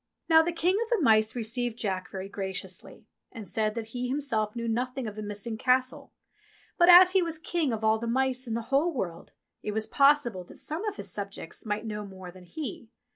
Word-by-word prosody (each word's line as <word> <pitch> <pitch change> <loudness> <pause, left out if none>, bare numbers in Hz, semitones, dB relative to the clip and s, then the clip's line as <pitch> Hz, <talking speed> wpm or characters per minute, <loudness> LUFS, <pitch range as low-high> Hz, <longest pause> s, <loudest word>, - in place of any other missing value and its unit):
Now 320 -1 +7
the 340 +2 -1
King 345 +3 +1
of 465 - -2
the 470 -3 +2
Mice 220 -5 +4
received 235 0 -2
Jack 190 -5 -2
very 190 0 -6
graciously, 190 -2 -6 0.3
and 220 -5 -9
said 215 +4 -1
that 225 -1 -5
he 250 0 -2
himself 245 -6 -1
knew 235 0 -3
nothing 250 +3 -2
of 210 -2 -5
the 215 - -6
missing 210 +2 -5
Castle, 255 0 +1 0.6
but, 345 0 +5
as 360 +1 +10
he 380 0 +4
was 330 -2 -2
King 320 -3 -1
of 220 -1 -3
all 220 0 +3
the 235 - -4
Mice 260 +1 0
in 225 - -2
the 235 +3 -5
whole 310 +6 +3
world, 170 -8 -4 0.3
it 210 - -4
was 220 0 -1
possible 275 -9 +3
that - - -14
some 320 +6 -4
of 420 -1 -2
his - - -7
subjects 200 -1 -6
might 210 +1 -2
know 210 -1 -4
more 190 -2 -10
than 185 0 -14
he. 235 - -7
230 Hz, 215 wpm, -28 LUFS, 210-280 Hz, 0.6 s, as